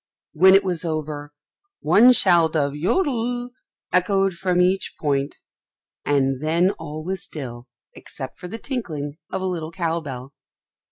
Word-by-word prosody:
When 190 +4 +7
it 195 - +5
was 180 -3 -2
over, 155 -3 -4 0.5
one 240 +4 +6
shout 170 -7 +4
of 140 -2 +1
"Jodel" 245 - -1 0.4
echoed 195 +1 +2
from 180 +1 0
each 185 +2 +1
point, 140 -2 -1 0.7
and 135 -2 +1
then 170 +5 +2
all 155 -3 -7
was 185 +2 -3
still 125 -5 -8 0.3
except 130 -2 -9
for 180 - -7
the 225 - -6
tinkling 160 - -5
of 190 0 -3
a - - -1
little 165 -4 -3
cow 170 -1 -1
bell. 135 -3 -8
170 Hz, 145 wpm, -22 LUFS, 145-190 Hz, 0.7 s, When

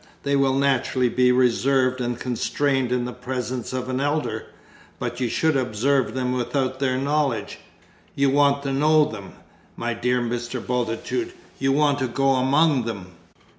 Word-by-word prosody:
They 140 0 +1
will 135 -1 +2
naturally 130 -2 +1
be 125 +1 +3
reserved 130 +1 +2
and 120 -1 -2
constrained 130 +1 -1
in 125 -1 0
the 125 - -5
presence 125 -1 -4
of 130 -1 -3
an 130 0 -2
elder. 140 -7 -1 0.5
But - - -4
you 125 -2 0
should 160 +4 +1
observe 130 +2 0
them 125 -1 -1
without 130 +1 -1
their 130 -2 0
knowledge 140 -5 -1 0.6
you 140 -1 +2
want 140 0 +3
to 135 -1 -2
know 155 +2 +4
them, 100 -10 -8 0.4
my 120 0 -2
dear 125 +2 0
Mr. 120 +1 -3
Bultitude, 125 - -2 0.3
you 135 0 +1
want 145 0 +2
to 130 - 0
go 135 +3 +1
among 135 +1 +3
them!" 100 -6 -6
130 Hz, 160 wpm, -23 LUFS, 125-140 Hz, 0.6 s, know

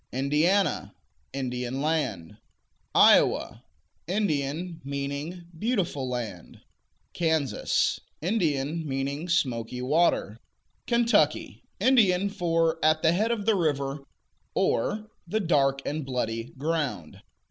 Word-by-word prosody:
Indiana 150 +9 +1 0.4
Indian 125 -1 -3
land. 145 - -2 0.6
Iowa - - +4 0.4
Indian; 170 -3 -1
meaning 140 +5 -4
"beautiful 170 - -1
land.'" 110 -9 -6 0.5
Kansas 160 -5 +1 0.2
Indian; 160 -5 0
meaning 140 +5 -3
"smoky 125 -7 0
water." 135 -7 +1 0.5
Kentucky 235 0 +2 0.2
Indian 200 -7 +4
for 165 -4 0
"at 155 0 +3
the 160 - +5
head 215 +6 +1
of 225 -4 -1
the 225 - +4
river," 145 -6 0 0.6
or 210 - 0 0.2
"the 215 +6 0
dark 135 -7 +2
and 155 +1 -2
bloody 115 -3 -2
ground." 145 - -3
155 Hz, 95 wpm, -27 LUFS, 135-175 Hz, 0.6 s, the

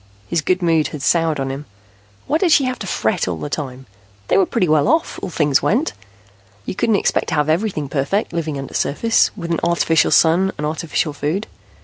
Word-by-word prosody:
His 170 -2 0
good 185 +4 0
mood 165 -2 +2
had 145 -3 -7
soured 165 -3 +2
on 135 0 -2
him. 135 +1 -7 0.6
Why 310 - 0
did 355 -2 +2
she 285 - +5
have 255 -1 -2
to 200 - -6
fret 110 - 0
all 90 -2 -2
the 145 - -6
time? 130 -3 -5 0.4
They - - +4
were 190 - +3
pretty 205 -7 0
well 155 +1 +3
off, 320 +5 +1
as 180 - -6
things 150 -2 +2
went. 260 - +1 0.7
You - - -3
couldn't 220 +3 +1
expect - - 0
to - - -1
have 150 0 +1
everything 160 -3 0
perfect, 145 +10 -1
living 160 -3 -2
undersurface, 145 +10 +1
with 170 -3 -5
an 165 - 0
artificial 170 -2 +2
sun 180 +4 +3
and 150 - -3
artificial 155 0 -2
food. 155 +9 -2
165 Hz, 205 wpm, -19 LUFS, 150-190 Hz, 0.7 s, she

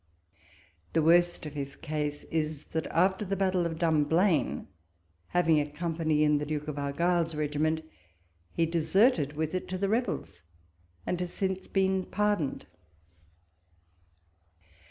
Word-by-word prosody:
The 160 - +3
worst 175 +1 +4
of 150 - -6
his 140 -2 -5
case 150 -2 -3
is, 155 -2 -2
that 160 -1 -1
after 190 +4 +2
the 195 0 -2
battle 185 -2 +1
of 165 -1 -5
Dumblain, 160 +1 +2 0.6
having 165 -3 +3
a 145 - -4
company 160 -1 0
in 150 -1 +3
the 150 - -3
Duke 150 0 -3
of 150 -1 -4
Argyll's 165 +3 0
regiment, 155 +1 0 0.7
he 165 - +1
deserted 165 - +2
with 155 +1 -2
it 185 - -2
to 185 - -3
the 195 +1 0
rebels, 215 - -2 0.6
and 180 - -1
has 180 -1 -3
since 190 -1 -2
been 190 -1 +1
par 210 +1 +1
doned. 145 -5 -4
165 Hz, 135 wpm, -29 LUFS, 150-185 Hz, 0.7 s, worst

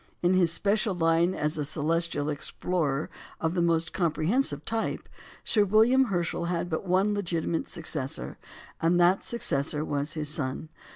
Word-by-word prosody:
In 175 +1 +4
his 180 -3 +3
special 205 +2 +1
line 165 +1 +2
as 150 +1 -1
a - - 0
celestial 155 0 0
explorer 150 0 -1 0.3
of 160 +1 -1
the 180 - +1
most 165 -1 +1
comprehensive 165 - 0
type, 225 0 -2 0.4
Sir 210 -3 +4
William 225 +6 +4
Herschel 175 -5 -2
had 175 0 -2
but 160 +4 -3
one 190 +3 +2
legitimate 170 -4 -1
successor, 150 -5 -4 0.4
and 170 +2 +3
that 175 +3 +4
successor 150 -9 -1
was 145 +1 -2
his 155 -2 -2
son. 145 +1 -3
170 Hz, 150 wpm, -27 LUFS, 155-185 Hz, 0.4 s, In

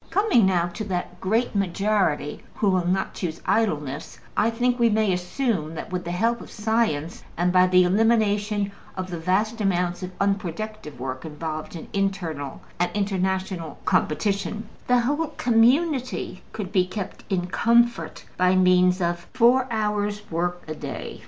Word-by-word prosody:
Coming 350 - +4
now 175 -3 +2
to 175 +5 -5
that 180 -2 -4
great 225 +6 +1
majority 195 -5 0
who 205 -3 +2
will 180 -2 +1
not 190 +2 0
choose 165 -3 -4
idleness, 150 -11 -1 0.2
I 215 - +3
think 245 +2 0
we 235 -1 +5
may 215 -3 +2
assume 180 - -1
that, - - -6
with 180 -1 -3
the - - -4
help 230 +6 +1
of - - -10
science, 210 -8 -1
and 175 +1 +1
by 185 0 +6
the 185 0 +5
elimination 205 0 +2 0.3
of 185 0 -4
the 170 - -4
vast 210 +7 0
amount 180 -3 0
of 185 - -4
unproductive 200 - -2
work 130 0 -4
involved 155 +1 -5
in 165 - -8
internal 170 -8 -2 0.2
and 175 - +2
international 190 -4 -1
competition, 205 +5 0 0.2
the 250 -1 +4
whole 290 +6 0
community 250 - +2
could 200 -4 -5
be 185 -2 +2
kept 190 0 -6
in 180 -2 0
comfort 235 +5 +2
by 180 0 +4
means 180 0 +4
of 175 0 -1
four 255 +1 +5
hours' 210 -2 -1
work 175 +2 -1
a 155 - -3
day. - - -6
190 Hz, 155 wpm, -24 LUFS, 175-220 Hz, 0.3 s, by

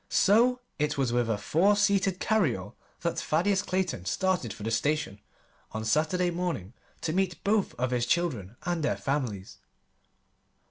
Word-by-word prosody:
So 245 +5 +4 0.2
it 150 -1 0
was 130 -4 +1
with 120 -1 +1
a 110 - +1
four 175 - +3
seated 200 -2 +2
carryall 150 - 0 0.3
that - - -1
Thaddeus 190 +5 +1
Clayton 185 - -2
started 185 - 0
for 105 - -9
the 110 - -2
station 145 -3 0 0.5
on 110 0 -4
Saturday 160 +8 +1
morning 170 - -3 0.3
to 155 - -1
meet 185 -1 -1
both 205 0 +1
of 125 0 -1
his 120 -1 0
children 120 - 0
and 175 -2 -1
their 150 - 0
families. 125 -9 -3
160 Hz, 150 wpm, -28 LUFS, 120-190 Hz, 0.5 s, So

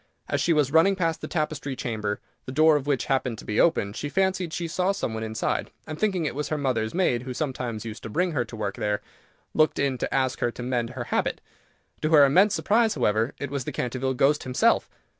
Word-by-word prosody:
As - - 0
she 170 - +2
was 150 -4 +2
running 165 +5 +5
past 165 -3 -1
the - - -5
Tapestry 150 -4 -2
Chamber, 105 -4 -3 0.3
the - - -4
door 155 +3 +5
of 145 -1 -1
which 135 -4 +1
happened 130 -3 0
to - - -10
be 105 - -1
open, 105 -12 +3
she 145 - -4
fancied 190 0 0
she 170 +1 -3
saw 180 +3 +1
some 195 - -3
one 110 - -4
inside, 110 0 -2 0.2
and 155 -1 -7
thinking 190 -6 +1
it - - -1
was 150 +2 -3
her 155 - -1
mother's 125 -5 -1
maid, 150 -10 +2
who 130 0 -6
sometimes 125 -7 -3
used 110 -1 -7
to - - -7
bring 180 - 0
her 125 -6 -1
work 105 -4 -4
there, 105 0 -1 0.5
looked 155 -1 +3
in 135 -3 0
to - - -2
ask 130 -1 0
her 120 - +1
to 125 - -7
mend 120 -2 -1
her 125 - -3
habit. - - 0 0.6
To 155 - +1
her 145 -2 +8
immense 185 +9 +4
surprise, 225 +1 +2
however, 115 -1 +1
it 140 -1 -5
was 140 -3 -3
the - - -3
Canterville 130 +1 -2
Ghost 145 +4 +3
himself! 130 -1 +2
135 Hz, 230 wpm, -26 LUFS, 120-160 Hz, 0.6 s, her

